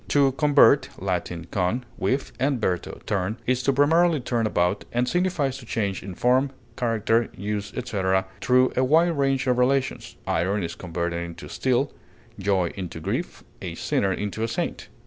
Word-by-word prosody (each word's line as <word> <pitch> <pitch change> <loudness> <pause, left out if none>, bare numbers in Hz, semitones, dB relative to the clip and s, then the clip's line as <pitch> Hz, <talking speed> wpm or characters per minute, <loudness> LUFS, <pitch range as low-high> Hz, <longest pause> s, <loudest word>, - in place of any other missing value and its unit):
To 140 -2 +4
convert 140 +1 +5
(L. 90 -2 0 0.3
con, 100 +7 0
with, 135 +1 0
and 135 -1 +1
verto, 90 -5 -2
turn) 100 +3 -1
is 130 0 +1
to 140 - +2
primarily 160 +4 +4
turn 120 -3 0
about, 90 0 +1
and 120 +1 +1
signifies 170 -7 0
to 125 - -12
change 100 -5 -1
in 95 -1 -7
form, 130 +5 +3 0.3
character, 115 -1 +1
use, 105 +1 -3
etc., 95 -5 0 0.2
through 130 0 +3
a 130 - +2
wide 165 +5 +4
range 135 -2 +1
of 125 -1 +2
relations; 130 +1 0
iron 100 +3 0
is 85 - -3
converted 85 -1 -3
into 85 -1 -7
steel, - - 0 0.5
joy 95 -3 +1
into 90 -3 -6
grief, - - -3 0.2
a - - -5
sinner 95 - 0
into 105 +3 -3
a 115 - +1
saint. 115 - -3
115 Hz, 165 wpm, -25 LUFS, 95-135 Hz, 0.5 s, convert